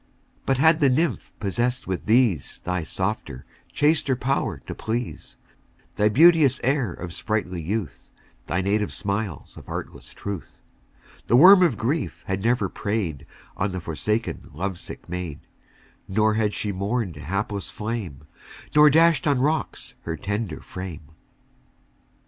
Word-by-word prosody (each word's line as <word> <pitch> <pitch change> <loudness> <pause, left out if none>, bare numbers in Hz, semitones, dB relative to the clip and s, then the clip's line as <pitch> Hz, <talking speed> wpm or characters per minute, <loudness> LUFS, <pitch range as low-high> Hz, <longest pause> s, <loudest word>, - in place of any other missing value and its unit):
2 - - -38 0.4
But 135 - +2
had 160 +3 +5
the 140 -3 +4
nymph 140 0 0
possess'd 120 +5 -1
with 95 -1 -3
these 110 - +2
Thy 90 0 -2
softer, 95 -6 -4 0.3
chaster 150 -3 +2
power 125 - -1
to - - -5
please, 115 +2 -4 0.6
Thy 105 +1 +3
beauteous 150 0 +6
air 130 -5 +1
of 85 0 -7
sprightly 95 -5 -2
youth, 100 +3 -4 0.4
Thy 90 - 0
native 105 +2 0
smiles 100 -6 -3
of - - -12
artless - - -7
truth 100 -4 -7 0.6
3 - - -25
The - - +4
worm 185 +8 +9
of 160 - +3
grief 140 +9 -2
had 95 0 -2
never 120 +2 +2
prey'd 100 -9 -3 0.3
On 100 +1 -1
the 95 - -3
forsaken 105 +7 -2
love 95 +2 -3
sick - - -9
maid; 90 -4 -5 0.7
Nor 110 +2 +2
had 105 -1 0
she 105 - -1
mourn'd 100 -2 -2
a - - -8
hapless 100 +6 -3
flame, 105 - -5 0.5
Nor 150 0 +8
dash'd 160 -2 +4
on 145 -2 +3
rocks 150 +4 -1
her 85 -1 -4
tender 100 -4 -3
frame. 85 -5 -8
105 Hz, 145 wpm, -24 LUFS, 95-130 Hz, 0.7 s, worm